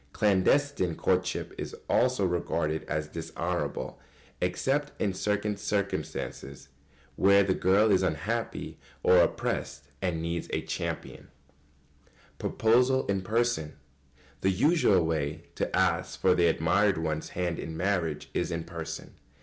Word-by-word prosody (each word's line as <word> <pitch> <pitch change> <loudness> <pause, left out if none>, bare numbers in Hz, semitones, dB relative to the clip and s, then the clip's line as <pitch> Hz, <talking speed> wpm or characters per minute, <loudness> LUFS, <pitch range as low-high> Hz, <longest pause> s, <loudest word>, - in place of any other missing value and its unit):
Clandestine 105 - +2
courtship - - 0
is - - -5
also 125 -6 +2
regarded 85 -3 -1
as 75 -1 -2
dishonourable, 80 -5 -3 0.4
except 135 +11 -1
in 100 -3 0
circumstances 100 -8 -2 0.5
where 100 +1 +5
the 95 -1 +1
girl 100 +4 +3
is 95 -1 +4
unhappy 95 +7 -2 0.2
or 90 - +6
oppressed 70 -5 0
and 90 -4 -1
needs 85 +1 -3
a - - 0
champion. - - -5
[Sidenote: - - -32
Proposal 125 +4 +3
in 100 -1 0
person.] 110 -6 0 0.6
The 95 - +3
usual 100 - +3
way 75 -2 -2
to - - -2
ask 95 -1 +1
for 95 - +4
the 85 -1 +3
admired 90 +4 +2
one's 80 -1 -2
hand 90 -2 -1
in 80 - -5
marriage 85 -4 -1
is - - -1
in 85 -1 -3
person. 80 -2 -7
90 Hz, 125 wpm, -28 LUFS, 80-105 Hz, 0.6 s, or